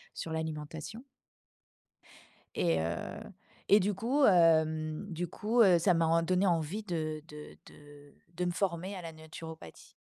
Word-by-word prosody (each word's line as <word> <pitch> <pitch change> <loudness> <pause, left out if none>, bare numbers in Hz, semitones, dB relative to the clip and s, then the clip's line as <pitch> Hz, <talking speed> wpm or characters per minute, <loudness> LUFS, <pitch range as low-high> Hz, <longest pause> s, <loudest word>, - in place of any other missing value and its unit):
sur 160 - -5
l'alimentation. 160 - -5 1.5
Et 85 -2 +1
heu, 85 +1 -1 0.8
et 205 - +7
du 205 +1 0
coup, 255 +8 +2
hem, 160 -2 +3
du 175 +1 -3
coup, 220 +7 +1
heu, 185 -5 +6
ça 180 +2 +3
m'a 165 -1 +2
en 165 +1 +3
donné 185 +3 +1
envie 175 +4 0
de 155 -5 -3
de 150 -1 -11
de 145 -1 -16 0.2
de 180 +2 -1
me 175 - 0
former 185 +1 -2
à 185 - -6
la 165 -1 -8
naturopathie. 160 - -11
165 Hz, 150 wpm, -31 LUFS, 155-185 Hz, 1.5 s, et